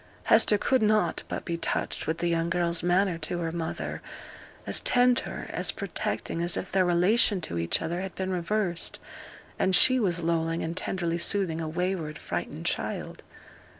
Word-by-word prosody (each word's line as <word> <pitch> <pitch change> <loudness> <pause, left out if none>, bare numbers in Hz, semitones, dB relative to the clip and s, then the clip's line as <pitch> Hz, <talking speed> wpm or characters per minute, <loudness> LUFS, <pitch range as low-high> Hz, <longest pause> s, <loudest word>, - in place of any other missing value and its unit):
Hester 210 - +5
could 260 +4 +2
not 215 0 +2
but - - -5
be 170 -2 -2
touched - - -2
with 160 - 0
the 175 - -1
young 170 0 0
girl's 170 -1 0
manner 175 0 +2
to 165 +2 -2
her 165 -1 -2
mother 165 -1 -4 0.6
as - - +1
tender, 245 0 +2
as - - 0
protecting 165 - -3
as 175 0 0
if - - -5
their 190 0 +3
relation 185 +4 +3
to 85 - -3
each 85 - 0
other 175 +2 -2
had 190 -1 -6
been 190 0 -3
reversed, 180 0 -1 0.6
and 190 -1 +3
she 255 +7 +6
was 180 -6 0
lulling 165 0 0
and 165 +1 -3
tenderly 170 -2 -2
soothing 170 -2 +1
a 160 - -3
wayward, 170 -2 -2
frightened - - -5
child. - - -3
175 Hz, 170 wpm, -27 LUFS, 165-190 Hz, 0.6 s, she